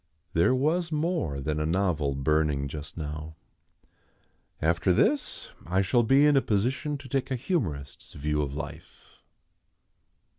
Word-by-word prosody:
There 85 +10 +4
was 165 +6 +1
more 155 - -1
than 75 +2 -2
a 75 - 0
novel 80 -6 +1
burning 70 0 +1
just 75 +2 -8
now. 75 0 -5 1.2
After 85 +3 +2
this 285 - +1
I 95 +3 +1
shall 120 +6 +3
be 135 +5 +5
in 150 -1 +5
a 135 - +5
position 130 +9 0
to 140 - -11
take 135 +1 -1
a 130 - 0
humorist's 90 - -3
view 75 +1 -1
of 70 -1 -3
life. - - -9
90 Hz, 140 wpm, -28 LUFS, -, 1.2 s, be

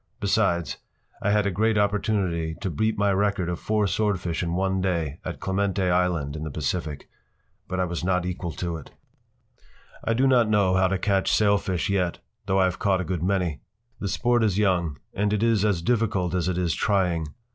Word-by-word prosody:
Besides, 95 - +1 0.4
I 105 - +1
had 105 0 +3
a 100 - +1
great 110 +4 +1
opportunity 100 -6 0
to 95 - -4
beat 110 +8 0
my 100 -1 +2
record 100 -2 0
of 85 - -3
four 105 -1 +1
swordfish 95 -4 -1
in 85 -1 -2
one 95 0 0
day 85 -5 -1
at - - -5
Clemente 95 0 0
Island 85 -5 0
in 75 - -5
the 80 - -4
Pacific. 75 0 -3 0.6
But 95 +1 -3
I 90 - +2
was 85 -1 -4
not 90 -1 +1
equal 90 -1 -3
to 85 -2 -3
it. 80 - -11 1.1
I 115 - +1
do 130 +3 +3
not 125 -4 +4
know 100 -3 +3
how 95 0 +4
to 95 +1 0
catch 95 0 +1
sailfish 100 -4 +2
yet, 90 -3 0 0.3
though 95 0 +2
I - - +5
have 95 -1 0
caught 95 -2 +2
a - - -4
good 90 -1 -2
many. 90 -4 0 0.4
The 100 - -3
sport 120 +4 +1
is 100 -4 +1
young 90 -7 +1 0.2
and 105 +1 0
it 105 +1 +1
is 115 -3 +3
as 100 -6 +1
difficult 105 -6 +1
as 90 -1 0
it 90 - -1
is 85 -3 +1
trying. 90 -6 +1
95 Hz, 200 wpm, -25 LUFS, 85-105 Hz, 1.1 s, I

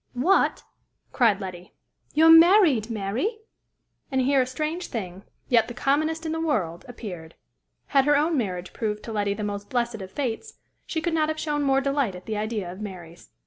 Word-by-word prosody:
"What!" 350 +11 +2 0.5
cried 225 -6 +3
Letty; 185 -2 -8 0.4
"you're 320 +2 +7
married, 325 - +6
Mary?" 230 - -2 0.7
And 265 - +1
here 270 +1 +3
a 250 - -1
strange 310 +7 -3
thing, 190 -4 -6 0.2
yet 230 -3 +3
the 240 - -8
commonest 310 +5 0
in 320 - -2
the 320 0 -2
world, 185 - -1
appeared; 180 -9 -8 0.5
had 275 -2 +4
her 295 0 +4
own 315 +3 +1
marriage 185 -8 -3
proved 210 -2 -3
to 230 - -7
Letty 205 -2 -1
the 210 - -5
most 205 0 -4
blessed 235 -3 -1
of 190 - -7
fates, 270 - -4 0.3
she 320 - -2
could 335 +1 -1
not 310 -1 +1
have 315 0 -3
shown 295 -1 -1
more 270 -1 +2
delight 275 -7 0
at 180 - -11
the 220 - -3
idea 210 -4 -3
of 185 +3 -10
Mary's. 175 -5 -9
240 Hz, 185 wpm, -25 LUFS, 200-305 Hz, 0.7 s, you're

